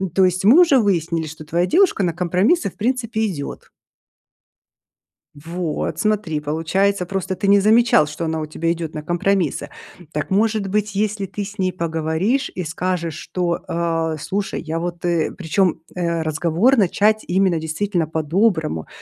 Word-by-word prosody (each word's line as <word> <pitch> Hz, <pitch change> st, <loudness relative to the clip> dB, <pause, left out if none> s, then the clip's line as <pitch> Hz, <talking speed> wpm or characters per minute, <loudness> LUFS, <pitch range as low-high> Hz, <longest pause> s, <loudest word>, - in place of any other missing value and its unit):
То 190 Hz, -, +5 dB
есть 185 Hz, +1 st, 0 dB
мы 245 Hz, -, +7 dB
уже 285 Hz, -7 st, +5 dB
выяснили, 170 Hz, -5 st, 0 dB
что 155 Hz, 0 st, -10 dB
твоя 170 Hz, +3 st, +1 dB
девушка 345 Hz, -, +3 dB
на 175 Hz, -, +1 dB
компромиссы, 185 Hz, -, +1 dB
в -, -, -20 dB
принципе, 230 Hz, -1 st, -1 dB
идет. 150 Hz, -8 st, -6 dB, 1.7 s
Вот, 165 Hz, +1 st, -4 dB
смотри, 210 Hz, -8 st, 0 dB
получается, 170 Hz, +6 st, 0 dB
просто 190 Hz, 0 st, -3 dB
ты 200 Hz, -, -1 dB
не 200 Hz, 0 st, +6 dB
замечал, 220 Hz, -6 st, +4 dB
что 150 Hz, +3 st, -5 dB
она 160 Hz, 0 st, -2 dB
у 155 Hz, -, -3 dB
тебя 165 Hz, +2 st, -1 dB
идет 165 Hz, -2 st, -5 dB
на 150 Hz, -, -5 dB
компромиссы. 175 Hz, -3 st, 0 dB, 0.4 s
Так 150 Hz, +3 st, -3 dB
может 215 Hz, +1 st, +1 dB
быть, 210 Hz, +1 st, -1 dB
если 205 Hz, 0 st, -1 dB
ты 205 Hz, +2 st, -5 dB
с 200 Hz, +2 st, -10 dB
ней 185 Hz, -1 st, +1 dB
поговоришь 165 Hz, -, -1 dB
и 180 Hz, -, -3 dB
скажешь, 170 Hz, 0 st, -2 dB
что, 170 Hz, +1 st, -2 dB
а, 165 Hz, -1 st, -1 dB
слушай, 195 Hz, +6 st, -3 dB
я 160 Hz, 0 st, -3 dB
вот, 175 Hz, +1 st, -5 dB
э 170 Hz, -2 st, +1 dB
Причем, 180 Hz, -1 st, 0 dB
э, 170 Hz, -2 st, -1 dB
разговор 170 Hz, -, +2 dB
начать 210 Hz, +2 st, +2 dB
именно 185 Hz, -2 st, +2 dB
действительно 165 Hz, +2 st, -1 dB
по-доброму, 160 Hz, -, 0 dB
180 Hz, 160 wpm, -20 LUFS, 160-200 Hz, 1.7 s, мы